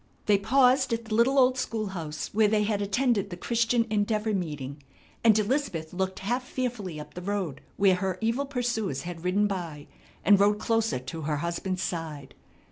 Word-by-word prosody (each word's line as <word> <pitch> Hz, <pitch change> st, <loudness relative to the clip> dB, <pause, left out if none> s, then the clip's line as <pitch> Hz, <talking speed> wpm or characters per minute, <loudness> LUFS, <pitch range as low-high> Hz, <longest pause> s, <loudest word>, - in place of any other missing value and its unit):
They 205 Hz, -2 st, +4 dB
paused 255 Hz, +3 st, +4 dB
at 230 Hz, 0 st, -2 dB
the 220 Hz, -, -5 dB
little 240 Hz, +5 st, +3 dB
old 255 Hz, -1 st, +4 dB
school 220 Hz, -4 st, -2 dB
house 160 Hz, -5 st, -5 dB
where 215 Hz, +1 st, +4 dB
they 210 Hz, 0 st, +2 dB
had 205 Hz, -1 st, 0 dB
attended 205 Hz, 0 st, +1 dB
the 175 Hz, -, -7 dB
Christian 230 Hz, +3 st, +1 dB
Endeavor 215 Hz, +1 st, +1 dB
meeting, 150 Hz, -6 st, -4 dB, 0.4 s
and 220 Hz, -2 st, +6 dB
Elizabeth 210 Hz, -, -1 dB
looked 190 Hz, +1 st, -2 dB
half 240 Hz, +6 st, -1 dB
fearfully 235 Hz, -10 st, -4 dB
up 150 Hz, -, -10 dB
the 180 Hz, -, -7 dB
road 185 Hz, -7 st, -3 dB, 0.2 s
where 195 Hz, -1 st, +5 dB
her 185 Hz, 0 st, -1 dB
evil 230 Hz, +5 st, 0 dB
pursuers 235 Hz, -, -2 dB
had 170 Hz, -1 st, -7 dB
ridden 190 Hz, +3 st, +2 dB
by, 170 Hz, -7 st, -4 dB, 0.4 s
and 200 Hz, +2 st, +6 dB
rode 205 Hz, +1 st, +4 dB
closer 225 Hz, -, +1 dB
to 130 Hz, +6 st, -7 dB
her 150 Hz, 0 st, -1 dB
husband's 180 Hz, +4 st, -2 dB
side. 155 Hz, -5 st, -5 dB
205 Hz, 180 wpm, -27 LUFS, 175-230 Hz, 0.4 s, and